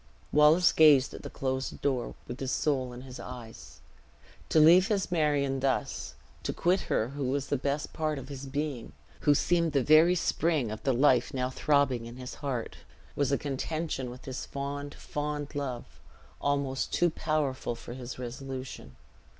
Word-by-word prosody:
Wallace 150 +4 +6
gazed 145 -4 +6
at - - -8
the - - -7
closed 130 0 -3
door, 130 -4 -1
with 120 - -6
his 130 -1 -2
soul 130 -4 0
in 120 0 -9
his 130 -1 -10
eyes. 120 -3 -10 0.7
To 160 - +4
leave 175 +5 +7
his 200 -5 0
Marion 145 -5 +1
thus, 135 0 -1 0.3
to - - -2
quit 180 +2 +1
her 110 - +1
who 140 0 -4
was 135 +2 -1
the - - +2
best 140 +2 -2
part 155 -1 -1
of 135 -1 -7
his 140 -1 -7
being, 140 -3 -4 0.4
who 145 - +7
seemed 170 0 +2
the 140 -3 +3
very 155 +5 +6
spring 160 -8 +1
of 110 - -6
the 135 - +1
life 125 -1 +3
now 125 0 -1
throbbing 135 -5 +1
in 120 - -9
his 125 -1 -7
heart, 130 -5 -3 0.4
was 140 -1 +1
a 140 - +3
contention 145 -1 -3
with 125 +1 -11
his 130 -1 -5
fond, 145 +1 -5
fond 150 0 -4
love, 135 -5 -3 0.6
almost 140 -2 0
too 175 -1 +2
powerful 145 -7 -1
for 120 +1 -9
his 125 0 -7
resolution. 130 - -7
140 Hz, 170 wpm, -29 LUFS, 130-150 Hz, 0.7 s, leave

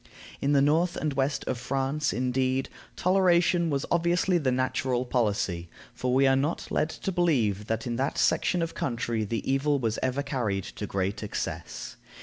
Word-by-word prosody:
In 140 +1 +2
the 140 -1 +5
north 165 +5 +2
and 155 -2 -1
west 135 +1 0
of 120 - -2
France, 135 +3 -1
indeed, 130 +2 0 0.3
toleration 175 -2 +3
was 140 -2 -1
obviously 175 +1 +2
the 135 -5 +1
natural 130 0 0
policy, 100 -8 -1 0.2
for 125 - -2
we 135 +2 +4
are 135 0 +5
not 145 +5 -1
led 155 - +1
to 195 - -4
believe 120 - +1
that 110 0 -2
in 120 -1 -2
that 135 +1 -1
section 175 -2 +2
of 165 - -4
country 115 -3 -2
the 110 +2 -3
evil 140 +2 +2
was 115 -4 -1
ever 130 +2 0
carried 110 -9 -1
to 105 +1 -6
great 95 +1 -2
excess. - - -5
135 Hz, 170 wpm, -27 LUFS, 115-150 Hz, 0.3 s, the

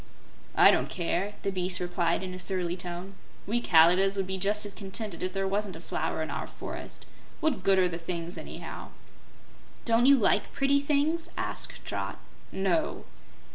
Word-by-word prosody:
"I - - +8
don't - - +1
care," 185 +3 -2
the 200 - 0
beast 185 -1 0
replied 175 0 0
in 185 -1 -5
a 185 - -7
surly 180 -2 -1
tone. 180 +1 -6 0.3
"We 235 +4 0
Kalidahs 180 +2 +5
would 195 - 0
be 190 0 -3
just 210 +2 +1
as 205 - -5
contented 200 -2 -5
if 185 - -1
there 195 0 -1
wasn't 200 -1 -1
a - - -8
flower 160 -1 -2
in 155 - -5
our - - -4
forest. - - -8 0.3
What 310 -11 0
good 195 0 +4
are 185 -1 +4
the 170 -1 -5
things 170 +1 -3
anyhow?" - - -7 1.0
"Don't 230 +1 +4
you 280 - +8
like 210 -3 +2
pretty 280 +1 +3
things?" 300 +3 +1
asked - - -2
Trot. - - -4 0.3
"No." 195 - 0
190 Hz, 175 wpm, -28 LUFS, 180-210 Hz, 1.0 s, I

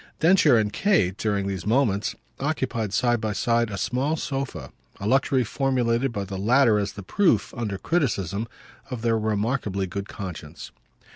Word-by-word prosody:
Densher 165 -6 +5
and 105 -2 0
Kate, 160 - +2
during 100 -2 -1
these 95 -3 -3
moments, 110 -4 +1 0.2
occupied 130 -7 -1
side 120 +2 +1
by 110 -1 -1
side 115 +2 +1
a 100 - -5
small 135 +9 0
sofa 135 - -4 0.3
a 100 - -5
luxury 130 +2 +2
formulated 125 0 0
by 100 -3 -3
the 95 -1 -6
latter 115 +1 +4
as 100 -1 -2
the 100 - -8
proof, 170 - +2
under 105 -5 -3
criticism, 110 - -1 0.4
of 125 -4 -5
their 115 -1 +2
remarkably 105 -2 -1
good 100 +2 -5
conscience. 85 -5 -8
115 Hz, 155 wpm, -25 LUFS, 100-130 Hz, 0.4 s, Densher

